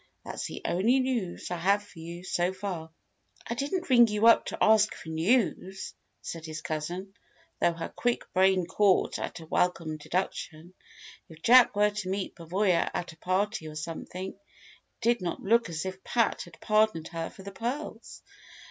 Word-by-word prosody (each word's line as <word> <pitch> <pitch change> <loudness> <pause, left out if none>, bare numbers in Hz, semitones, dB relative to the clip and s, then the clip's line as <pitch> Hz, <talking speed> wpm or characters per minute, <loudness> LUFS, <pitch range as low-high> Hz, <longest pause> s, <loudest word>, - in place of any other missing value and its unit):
That's - - -4
the - - -8
only 225 +9 +3
news 240 -11 -2
I 175 - -1
have 200 +4 +2
for 205 -5 -15
you, 170 +2 -8
so 180 0 0
far." 185 -4 -5 0.6
"I - - -2
didn't 290 +9 -2
ring 240 -3 +7
you 210 +1 +1
up 230 - +6
to - - -4
ask 215 -1 +4
for 160 - -10
news," 190 +2 0 0.3
said 165 -1 -6
his 155 -1 -6
cousin, 175 +5 -4 0.5
though 170 - +3
her 165 0 -5
quick 245 -1 -1
brain 190 -1 +4
caught 200 +1 +2
at - - -5
a - - -10
welcome 160 -1 0
deduction: 170 0 -4 0.6
if 160 0 -14
Jack 245 -2 +7
were 210 0 +4
to 205 -3 -4
meet 195 0 -2
Pavoya 180 +1 +1
at 175 - -3
a - - -20
party 185 0 -1
or 155 - -8
something, 170 +4 -5
it 200 - -30 0.6
did 235 -1 +2
not 175 -2 -3
look 230 0 +3
as 160 +1 -4
if 190 0 -6
Pat 230 -2 +1
had 165 -2 -16
pardoned 215 -6 +2
her 165 -1 -4
for 190 - -13
the 200 - -7
pearls. 245 +9 -5
190 Hz, 175 wpm, -28 LUFS, 170-215 Hz, 0.6 s, ring